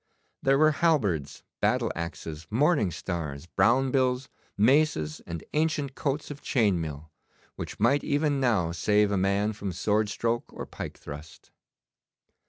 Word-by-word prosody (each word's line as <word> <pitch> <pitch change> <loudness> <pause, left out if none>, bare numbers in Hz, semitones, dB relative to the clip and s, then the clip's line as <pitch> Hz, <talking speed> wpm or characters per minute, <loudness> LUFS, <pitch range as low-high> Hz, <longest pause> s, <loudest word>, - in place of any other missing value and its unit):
There 135 0 +3
were 155 +1 +5
halberds, 115 - 0 0.2
battle - - +1
axes, 85 -1 -6
morning 135 - +3
stars, 80 -4 -5
brown 130 +8 +2
bills, 130 -1 +1 0.3
maces, 110 - +2
and 85 -2 -5
ancient 150 -3 0
coats 145 +2 -2
of 145 - -8
chain 105 -9 +2
mail, 75 0 -6 0.4
which - - -7
might 120 +7 +3
even 145 -1 +1
now 110 -10 +2
save 105 +5 +2
a - - +1
man 100 +3 +1
from 100 -2 -4
sword 105 +4 +1
stroke 115 +2 -2
or - - -6
pike - - -7
thrust. 75 +3 -11
105 Hz, 140 wpm, -27 LUFS, 85-140 Hz, 0.4 s, were